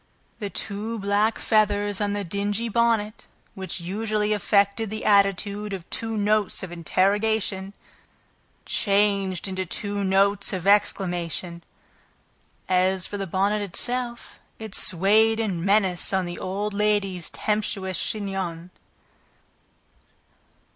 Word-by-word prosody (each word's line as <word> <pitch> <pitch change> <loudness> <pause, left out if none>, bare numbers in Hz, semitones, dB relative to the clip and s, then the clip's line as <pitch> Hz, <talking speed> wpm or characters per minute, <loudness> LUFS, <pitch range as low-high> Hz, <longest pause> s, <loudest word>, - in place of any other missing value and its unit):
The 205 -3 -4
two 210 +4 -4
black 205 +2 +1
feathers 205 -2 +1
on 205 0 0
the 205 0 -2
dingy 205 +5 -2
bonnet, 225 -1 0 0.3
which 190 0 -4
usually 210 +4 -1
affected 200 +1 +1
the 215 +1 -5
attitude 200 0 +2
of 185 -3 -7
two 225 -1 -2
notes 210 -1 +1
of 185 - -6
interrogation, 195 +3 0 0.9
changed 200 -2 +1
into 190 0 -3
two 200 +3 -3
notes 195 +1 +2
of 185 -1 -4
exclamation; 175 -4 0 1.0
as 185 0 +2
for 205 - -4
the 195 - -3
bonnet 200 +4 0
itself, 240 +4 0 0.2
it 220 -3 -8
swayed 205 +5 +3
in 190 -7 -2
menace 195 -2 +3
on 190 -1 +1
the 175 0 -6
old 200 +3 -3
lady's 200 -4 0
tempestuous 200 -3 -2
chignon. 190 -5 -4
200 Hz, 115 wpm, -24 LUFS, 190-210 Hz, 1.0 s, swayed